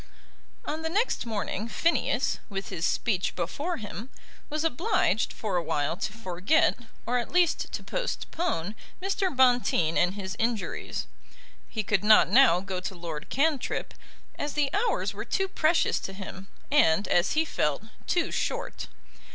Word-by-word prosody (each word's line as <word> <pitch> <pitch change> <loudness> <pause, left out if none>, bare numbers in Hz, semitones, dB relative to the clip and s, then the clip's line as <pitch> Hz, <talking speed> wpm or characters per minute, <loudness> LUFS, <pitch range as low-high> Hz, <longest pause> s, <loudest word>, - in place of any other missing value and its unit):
On 310 +2 -3
the 320 - -2
next 415 - 0
morning 215 -1 -2
Phineas, 335 +8 +1
with 195 -1 -4
his 165 - -1
speech 195 -6 0
before 285 - -2
him, 215 +2 -7 0.4
was 305 +1 -1
obliged 330 - +1
for 205 -5 -2
a 175 - 0
while 155 0 0
to 205 - -3
forget, 210 - +2 0.3
or 245 +1 +1
at 240 - -5
least 355 -2 +2
to - - -4
postpone, 335 - -2 0.3
Mr. 390 +1 0
Bonteen 245 - +3
and 180 +2 +2
his 190 -2 -5
injuries. 225 -4 -2 0.6
He 220 - -2
could 205 -1 +1
not 215 0 +7
now 235 -10 +6
go 190 -1 -4
to 185 +1 -5
Lord 165 -2 -6
Cantrip, 285 0 0 0.5
as 290 0 -2
the 290 -2 0
hours 420 +5 +1
were - - -5
too 385 -1 0
precious 330 -2 +2
to 195 - -6
him, 190 0 -8 0.2
and, 195 - +4
as 175 +1 +2
he 315 +1 +2
felt, 150 - -1 0.2
too 345 - +1
short. - - -3
225 Hz, 150 wpm, -28 LUFS, -, 0.6 s, not